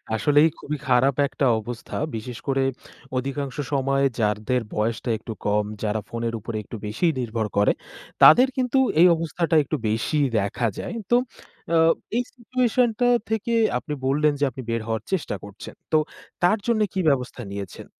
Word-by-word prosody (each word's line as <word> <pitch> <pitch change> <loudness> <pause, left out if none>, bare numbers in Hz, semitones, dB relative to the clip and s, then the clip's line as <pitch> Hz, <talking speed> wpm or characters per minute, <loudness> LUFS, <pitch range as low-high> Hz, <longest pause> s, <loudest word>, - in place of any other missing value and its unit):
আসলেই 145 +8 +4
খুবই 150 +1 -4
খারাপ 130 +2 +3
একটা 135 +1 -1 0.2
অবস্থা। 120 +2 -6 0.2
বিশেষ 115 +2 -6
করে 135 -1 +1 0.5
অধিকাংশ 135 +1 -3 0.2
সময়ে 135 0 +2
যাদের 105 +4 0
বয়সটা 115 +3 -1
একটু 115 - -7
কম, 105 0 +2 0.2
যারা 105 0 -1
ফোনের 115 0 -3
উপরে 110 +1 -5
একটু 110 - -9
বেশি 115 +12 0
নির্ভর 115 -3 -2
করে, 105 - +5 0.5
তাদের 255 +2 +9
কিন্তু 255 +1 +2 0.2
এই 180 - +9
অবস্থাটা 165 +1 -1
একটু 145 - -3
বেশিই 135 +7 +1
দেখা 100 +4 -1
যায়। 230 - -5 0.2
তো 240 - +6 0.6
আ - - +5 0.4
এই 245 - +2
situation 250 0 +1
টা 245 - +3 0.2
থেকে 220 +2 -1 0.2
আপনি 150 +4 -5
বললেন 150 +2 +3
যে - - 0
আপনি 130 - -8
বের 115 -1 -1
হওয়ার 110 -1 -2
চেষ্টা 170 - -1
করছেন। 100 0 -10 0.2
তো - - +7 0.5
তার 180 +5 +4
জন্য 230 -2 +2
কি 190 - -2
ব্যবস্থা 125 -2 -1
নিয়েছেন? 100 -2 -7
135 Hz, 160 wpm, -24 LUFS, 110-165 Hz, 0.6 s, তাদের